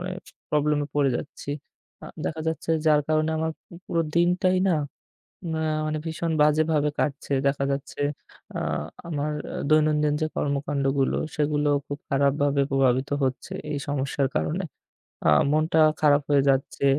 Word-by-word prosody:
মানে 185 +1 -4 0.4
problem 150 0 +2
এ - - -6
পড়ে 145 -2 +3
যাচ্ছি। 145 - -7 0.5
আ - - -8 0.2
দেখা 160 - -3
যাচ্ছে, 160 0 -3 0.2
যার 150 -1 +5
কারণে 155 0 +2
আমার 160 0 0 0.2
পু - - -21
পুরো 170 - 0
দিনটাই 180 +2 +3
না 180 - +3 0.8
মা 160 - -1 0.3
মানে 155 0 -1
ভীষণ 160 +1 -2
বাজেভাবে 150 0 +3
কাটছে। 140 0 -2
দেখা 140 0 +1
যাচ্ছে 140 +1 -5 0.6
আ - - -1 0.5
আমার 150 -2 -2 0.2
আ - - -3
দৈনন্দিন 150 -1 +3
যে 155 - +1
কর্মকাণ্ডগুলো 140 -1 0 0.2
সেগুলো 150 0 +1 0.2
খুব 145 - -5
খারাপভাবে 140 0 +2
প্রভাবিত 135 0 +2
হচ্ছে 130 -1 -3 0.2
এই 145 - -1
সমস্যার 140 0 0
কারণে। 185 +5 -1 0.6
আ - - +6 0.2
মনটা 155 +1 +3 0.2
খারাপ 145 -1 +5
হয়ে 145 -1 +5
যাচ্ছে। 135 +1 0
150 Hz, 145 wpm, -25 LUFS, 140-155 Hz, 0.8 s, আ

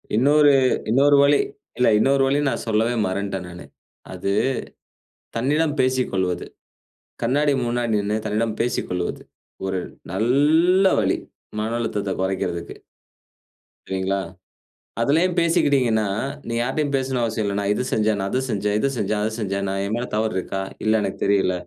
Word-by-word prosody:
இன்னொரு, 145 +4 +5 0.4
இன்னொரு 140 +4 +5
வழி 140 - +4 0.4
இல்ல 125 - +3
இன்னொரு 135 +3 +3
வழி 140 +2 +2
நான் - - -3
சொல்லவே 115 +2 +1
மறந்த்ட்டேன் 95 -1 -3
நானு. 90 0 -10 0.5
அது 100 - -2 1.1
தன்னிடம் 145 +5 +1
பேசிக்கொள்வது, 125 -9 0 0.8
கண்ணாடி 145 +4 +2
முன்னாடி 120 -1 -1
நின்னு, 105 +1 -1
தன்னிடம் 110 +1 -1
பேசிக்கொள்வது. 90 -7 -2 0.4
ஒரு 95 -1 -1 0.3
நல்ல 150 - +3
வழி, - - +1 0.4
மன 110 +1 -2
அழுத்தத்த 105 -4 -2
கொறைக்குறதுக்கு. 90 -3 -2 1.1
சரிங்களா? 95 +1 -1 0.8
அதுலயே 155 +9 +3
பேசிக்கிட்டீங்கனா, 135 -9 +2 0.4
நீ 115 - -3
யாட்டயும் 140 +4 -1
பேசணும்னு 130 -2 -1
அவசியம் 110 -2 -1
இல்ல. 100 - -1
"நான் 100 0 0
இத 115 - -1
செஞ்சேன், 110 -1 +1
நான் 95 0 -2
அத 130 - +1
செஞ்சேன், 105 0 0
இத 140 - +1
செஞ்சேன், 105 0 -1
அத 110 - +1
செஞ்சேன் 100 -2 -2
என் 100 +2 -3
மேல 120 +1 -3
தவறு 110 0 0
இருக்கா? 95 +1 -3 0.2
இல்ல 110 0 +3
எனக்கு 100 -2 -3
தெரியல. 100 -2 +2
110 Hz, 135 wpm, -22 LUFS, 100-135 Hz, 1.1 s, இன்னொரு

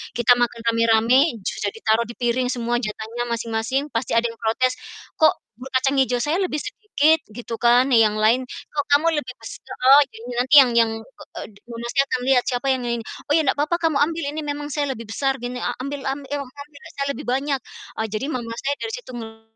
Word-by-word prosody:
kita 240 +1 +5
makan 240 -1 -1
rame-rame 230 +2 +3 0.3
sudah 200 - -2
ditaruh 225 +1 +1
di 235 - -8
piring 245 +1 0
semua 240 0 -1
jatahnya 225 +1 -4
masing-masing, 230 +5 -2
pasti 230 +1 -2
ada 230 0 +2
yang 230 - -11
protes, 255 +3 0 0.4
"Kok, 315 - +6 0.2
bubur 260 +2 -9
kacang 275 +1 +1
hijau, 250 -2 +2
saya 305 +6 0
lebih 355 -6 -1
sedikit?" 320 -7 +1 0.2
Gitu 235 0 -6
kan, 245 +3 +4
yang 225 -4 +4
lain, 235 +4 +3
"Kok 290 +3 -5
kamu 305 +3 +4
lebih 250 -3 -4
bes" 225 - -8
heeh, 270 +3 +6
jadi 225 +2 -11
nanti 255 +4 +3
yang 250 -2 +3
yang, 225 -1 +4 0.5
e - - -3 0.3
mama 235 0 -7
saya 275 0 +4
akan 255 - -1
melihat 260 -2 +4
siapa 250 +1 -2
yang 255 - -3
ini 235 - -1
ini. - - -14 0.2
"Oh - - +3
ya 320 - +4
nggak 265 - +1
papa 305 +4 +1
kamu 320 -4 +2
ambil 330 0 -4
ini, 310 +1 -4
memang 290 0 -4
saya 290 -1 0
lebih 230 -1 -9
besar 270 +3 0
gini, 245 +1 -4
a 245 - -1
ambil 280 +1 -5
ambil, 275 0 -4
emang 280 -3 -4
ambil 285 0 -13
lah - - -11
saya 275 - -1
lebih - - -8
banyak." 270 +2 0 0.4
Eee, 220 - 0
jadi 215 +6 -2
mama 230 -2 -4
saya 280 +1 +1
dari 445 0 -4
situ - - -10
ngel 225 -1 -9
250 Hz, 220 wpm, -22 LUFS, 230-285 Hz, 0.5 s, Kok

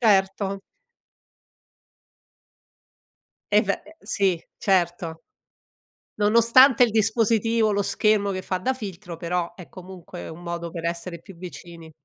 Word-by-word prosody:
Certo. 195 -2 +2 2.9
Eh 210 +2 +6
ve 195 - -1
ehm, 320 - -15
sì 190 -5 0 0.2
certo. 175 -3 0 0.9
Nonostante 235 +5 +6
il 235 - 0
dispositivo, 225 0 +2
lo 200 - +1
schermo 205 -1 +2
che 185 - -4
fa 185 -1 -2
da 260 +8 -1
filtro, 190 -6 -7
però 175 +1 -2
è 180 -1 -12
comunque 185 -1 -10
un 160 +2 -10
modo 170 -1 -5
per 170 0 -7
essere 170 0 -4
più 195 - -13
vicini. 170 -2 -10
190 Hz, 120 wpm, -24 LUFS, 175-215 Hz, 2.9 s, Eh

